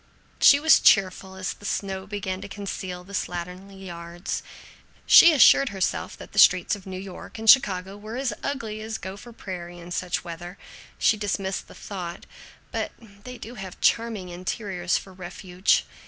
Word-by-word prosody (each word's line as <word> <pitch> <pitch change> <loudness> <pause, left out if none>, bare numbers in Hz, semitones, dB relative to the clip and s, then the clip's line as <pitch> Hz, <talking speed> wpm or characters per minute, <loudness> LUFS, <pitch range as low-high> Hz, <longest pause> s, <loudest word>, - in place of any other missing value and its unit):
She 285 - +7
was 320 +2 +6
cheerful 190 -1 +3
as 185 -1 -3
the - - -20
snow 195 -2 -3
began 190 -2 -4
to - - -7
conceal 190 -3 -6
the 195 +2 -14
slatternly 185 +2 -5
yards. 170 0 -5 0.6
She 340 - +9
assured 275 -2 +6
herself 190 -2 -2
that - - -11
the - - 0
streets 180 +2 +6
of 195 -2 -13
New 185 -1 -5
York 190 +3 -9
and 225 0 -6
Chicago 195 -6 +5
were 215 +3 -7
as 265 -1 -1
ugly 225 -6 -4
as 220 0 -4
Gopher 200 +5 -9
Prairie 175 -5 -8
in 175 0 -11
such 180 0 -2
weather; 175 +1 -8 0.4
she 220 - +3
dismissed 195 -2 -3
the - - -14
thought, 180 -3 -7 0.5
"But - - -3 0.3
they 250 +2 -8
do 235 - -9
have 195 -5 -9
charming 225 -5 +1
interiors 180 0 -2
for 190 - -9
refuge." 185 0 0
190 Hz, 165 wpm, -25 LUFS, 180-215 Hz, 0.6 s, She